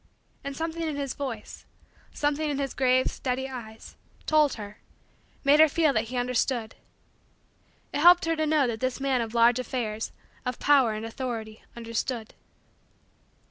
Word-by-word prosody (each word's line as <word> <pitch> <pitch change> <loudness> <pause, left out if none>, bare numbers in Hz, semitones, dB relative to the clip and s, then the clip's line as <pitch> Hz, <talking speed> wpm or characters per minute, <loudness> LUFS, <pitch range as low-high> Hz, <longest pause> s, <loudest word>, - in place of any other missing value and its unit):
And 280 0 -5
something 325 +1 -3
in 315 -3 -2
his 280 -2 -3
voice 250 -7 -6 0.5
something 295 +1 -1
in 285 - -1
his 275 -2 -2
grave, 255 0 +3
steady, 260 0 -2
eyes 225 -4 -9 0.3
told 305 -3 +3
her 210 -1 -9 0.6
made 285 +2 +5
her 315 0 +8
feel 310 -1 +2
that 220 -1 +1
he 250 +3 -5
understood. 245 -2 0 1.2
It - - -1
helped 350 +3 +7
her 330 0 +1
to 310 -1 0
know 300 -2 +3
that 230 -2 -2
this 255 +1 -2
man 270 -2 +1
of 230 0 -5
large 235 +1 +5
affairs, 225 -3 -3 0.3
of 250 -1 -3
power 270 -6 +4
and 215 +1 -5
authority, 225 -2 -5
understood. 230 0 -4
255 Hz, 155 wpm, -27 LUFS, 230-290 Hz, 1.2 s, her